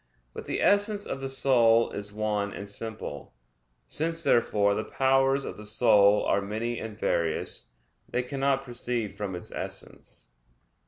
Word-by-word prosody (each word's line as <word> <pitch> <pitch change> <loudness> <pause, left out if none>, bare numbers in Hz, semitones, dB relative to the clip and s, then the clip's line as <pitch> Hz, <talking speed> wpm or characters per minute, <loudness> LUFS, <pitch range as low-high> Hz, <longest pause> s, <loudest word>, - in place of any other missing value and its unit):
But - - -7
the - - -2
essence 205 0 +2
of 135 - -5
the 135 - -3
soul 120 -4 +4
is 100 0 -5
one 105 -1 -1
and 100 - -7
simple. 100 - -7 0.5
Since, 165 +2 -3
therefore, 105 -6 +3
the 110 - -2
powers 135 +1 +2
of - - -6
the 105 - -10
soul 105 -2 +5
are 100 - +2
many 110 +4 -3
and 110 -2 -7
various, 85 -6 -1 0.4
they 125 - -1
cannot 135 +1 0
proceed 120 -4 -2
from 100 -2 -4
its 90 - -8
essence. - - -7
115 Hz, 150 wpm, -27 LUFS, 105-135 Hz, 0.5 s, soul